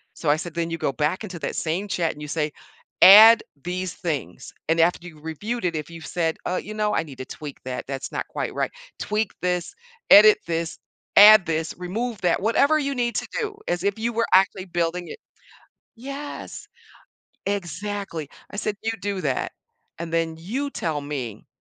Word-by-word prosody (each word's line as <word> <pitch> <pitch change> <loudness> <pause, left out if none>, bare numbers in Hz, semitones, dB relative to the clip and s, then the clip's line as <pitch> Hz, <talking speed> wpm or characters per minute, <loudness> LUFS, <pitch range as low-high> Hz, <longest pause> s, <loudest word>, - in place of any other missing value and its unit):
So 155 - -2
I 150 - +3
said, 175 0 -6
"Then 170 0 -1
you 165 - -2
go - - 0
back 155 +8 -1
into 185 -5 -7
that - - -4
same 175 +6 -2
chat 170 -3 0
and 150 - -13
you 150 - -6
say, 150 -1 -1 0.5
'Add 220 +4 +10 0.2
these 180 0 -3
things,' 145 - -5 0.2
and 165 +1 +2
after 175 +1 +2
you've 155 -3 -14
reviewed 205 +8 -4
it, 170 -2 0
if 155 0 -4
you've 165 -1 -10
said, 165 -2 -1
'Uh, 180 - -1
you 215 - -7
know, 210 0 0
I - - +2
need 140 -5 -12
to 130 - -5
tweak 145 0 -8
that, 125 -1 -4
that's 135 -1 -5
not - - -4
quite - - -4
right', - - -1 0.3
tweak 210 -1 -1
this, 180 -1 -1 0.4
edit 215 +1 +9
this, 165 -1 -2 0.4
add 210 -2 +10
this, 160 0 -1
remove 210 +5 -4
that, 180 +1 +1
whatever 280 +8 +3
you 280 -1 -1
need 240 -1 -1
to - - -2
do 420 -1 -4
as 175 0 -1
if 200 +1 0
you 235 +2 -1
were 230 +1 +1
actually 190 0 +4
building 175 0 -2
it" - - -9 0.8
Yes! 275 +4 -7 0.8
Exactly. 200 -4 -4 0.2
I 205 - -8
said, 210 0 -2
"You 225 +1 -1
do 200 -1 -3
that, 135 -5 -1 0.5
and 170 0 -5
then 165 -1 0
you 250 +12 -3
tell 160 - -2
me 130 -7 -6
180 Hz, 190 wpm, -24 LUFS, 160-210 Hz, 0.8 s, Add